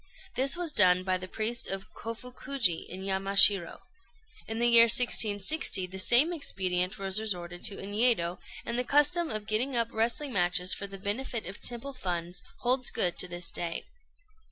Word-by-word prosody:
This 270 +5 +1
was 350 -3 -1
done 185 -6 +4
by 185 -1 -2
the 185 - -8
priests 225 +4 -2
of 195 +1 -6
Kofukuji, 230 -4 -3
in 190 +2 -8
Yamashiro. 195 -1 +2 0.7
In 225 - -6
the 235 - 0
year 235 -1 +8
1660 215 -1 +3
the 190 +1 -8
same 260 - +5
expedient 185 - -1
was 195 0 +1
resorted 175 -5 -6
to 200 - -1
in 200 +1 -8
Yedo, 210 -6 +1 0.3
and 235 +1 -3
the - - -1
custom 295 +6 +1
of 215 -1 -4
getting 240 +5 -1
up 230 -1 +2
wrestling 240 +5 -2
matches 180 0 +1
for 200 - -5
the 195 0 -10
benefit 220 +4 -4
of 190 +3 -9
temple 245 +3 -4
funds 180 -6 -6 0.2
holds 255 +1 0
good 175 -1 0
to - - +1
this 175 -1 -2
day. 170 -1 -5
210 Hz, 170 wpm, -27 LUFS, 185-245 Hz, 0.7 s, year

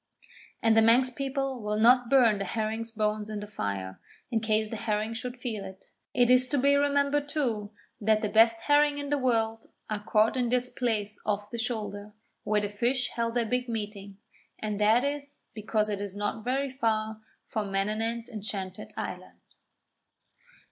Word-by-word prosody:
And 225 -1 +5
the 225 - +6
Manx 245 +3 +5
people 270 -1 -3
will 210 0 -1
not 245 +1 +5
burn 235 -7 +5
the - - -1
herring's 220 +2 -2
bones 215 -1 -1
in 215 -1 -4
the 205 - -6
fire, 100 - -4 0.3
in 225 - +2
case 215 -1 +1
the - - -3
herring 215 0 -1
should 250 +2 -5
feel 230 -5 -4
it. 190 0 -11 0.2
It 245 0 +4
is 255 0 +6
to 290 - 0
be 280 +2 +4
remembered, 285 0 +2
too, 235 -9 -1 0.3
that 215 +1 +2
the - - +2
best 225 +1 +5
herring 290 +1 +3
in 285 -1 -4
the 290 - +2
world 225 -3 0 0.2
are 210 -1 -2
caught 215 +2 +3
in 250 -2 0
this 250 +1 +1
place 215 -4 -2
off 205 0 -2
the 235 - -4
Shoulder, 210 -3 -4 0.3
where 210 0 +1
the 205 - -1
fish 245 +5 0
held 230 0 -2
their 240 -1 +2
big 250 +2 -1
meeting, 205 -3 -5 0.4
and 210 -1 -3
that 220 +4 +5
is 285 0 -4
because 215 0 0
it 205 -1 -3
is 200 -1 -5
not 205 +2 -3
very 265 +3 -1
far 220 -3 -1 0.2
from 210 -3 -3
Manannan's 220 +4 -1
enchanted 200 -4 -5
island. - - -6
225 Hz, 175 wpm, -28 LUFS, 210-250 Hz, 0.4 s, the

